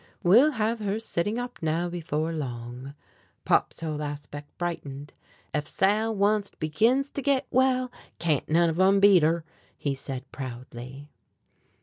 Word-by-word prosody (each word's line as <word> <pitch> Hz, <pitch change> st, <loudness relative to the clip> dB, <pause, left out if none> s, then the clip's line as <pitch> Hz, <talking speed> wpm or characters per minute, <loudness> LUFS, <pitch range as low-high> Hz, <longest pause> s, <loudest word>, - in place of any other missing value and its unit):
"We'll 245 Hz, +13 st, +6 dB
have 225 Hz, 0 st, 0 dB
her 210 Hz, 0 st, -1 dB
sitting 210 Hz, 0 st, -2 dB
up 245 Hz, 0 st, -5 dB
now 165 Hz, +2 st, 0 dB
before 165 Hz, -2 st, -2 dB
long." 125 Hz, -1 st, -6 dB, 0.5 s
Pop's -, -, +2 dB
whole 155 Hz, -2 st, -3 dB
aspect 145 Hz, 0 st, -6 dB
brightened. 145 Hz, -5 st, -5 dB, 0.4 s
"Ef 150 Hz, 0 st, -1 dB
Sal 215 Hz, +3 st, +1 dB
onct 205 Hz, -1 st, +1 dB
begins 230 Hz, -, +2 dB
to 280 Hz, -, -4 dB
git 275 Hz, -1 st, +2 dB
well, 255 Hz, -1 st, +2 dB, 0.3 s
can't 155 Hz, -5 st, 0 dB
none 165 Hz, +1 st, +4 dB
of 165 Hz, -, -4 dB
'em 195 Hz, +1 st, +5 dB
beat 195 Hz, -3 st, +7 dB
her," 160 Hz, +1 st, +1 dB, 0.3 s
he 140 Hz, -, -1 dB
said 135 Hz, -1 st, -6 dB
proudly. 130 Hz, +2 st, -8 dB
165 Hz, 140 wpm, -27 LUFS, 145-215 Hz, 0.5 s, beat